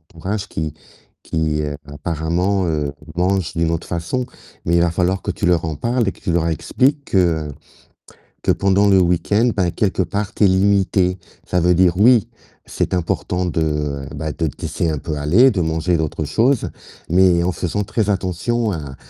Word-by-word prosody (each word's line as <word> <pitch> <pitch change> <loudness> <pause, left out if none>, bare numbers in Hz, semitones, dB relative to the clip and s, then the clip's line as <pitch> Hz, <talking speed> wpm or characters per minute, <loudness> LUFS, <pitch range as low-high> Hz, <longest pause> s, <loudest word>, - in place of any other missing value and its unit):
entourage 100 +5 -3
qui 80 -2 -3 0.5
qui, 80 -2 -1
heu, 75 -1 -4
apparemment, 85 +6 -1
heu, 75 -3 -1 0.2
mange 95 0 0
d'une 85 -1 +1
autre 85 - -3
façon, 85 +9 -2 0.4
mais 85 - +2
il - - +4
va 85 - +3
falloir 95 +2 0
que - - -5
tu 90 - -3
leur 85 -2 +2
en 80 - -3
parles 115 - 0
et - - +1
que - - -19
tu 85 - -1
leur 85 -1 +1
expliques 135 - 0
que 80 -5 +1 0.9
que - - +1
pendant 100 +1 +2
le 95 -1 +5
week-end, 90 +7 +2
bah, 90 -3 +1
quelque 95 0 0
part 100 +2 -3
tu - - +2
es - - +7
limité. 95 -1 +2 0.3
Ça 90 - +1
veut 90 +1 +3
dire 90 0 +3
oui, 115 0 +5 0.4
c'est - - -2
important 90 +1 -1
de, 75 -4 -1
bah, 80 -1 -3
de 80 +1 -2
te - - -12
laisser 85 - -1
un 75 - -2
peu 75 0 -4
aller, 95 - +5
de 95 - -1
manger 80 +2 0
d'autres 80 0 -2
choses, 115 - +1 0.4
mais 90 -1 +4
en 90 - +1
faisant 90 +5 -2
très 105 +1 -1
attention 100 +4 -1
à 70 -6 -6
90 Hz, 185 wpm, -19 LUFS, 80-100 Hz, 0.9 s, es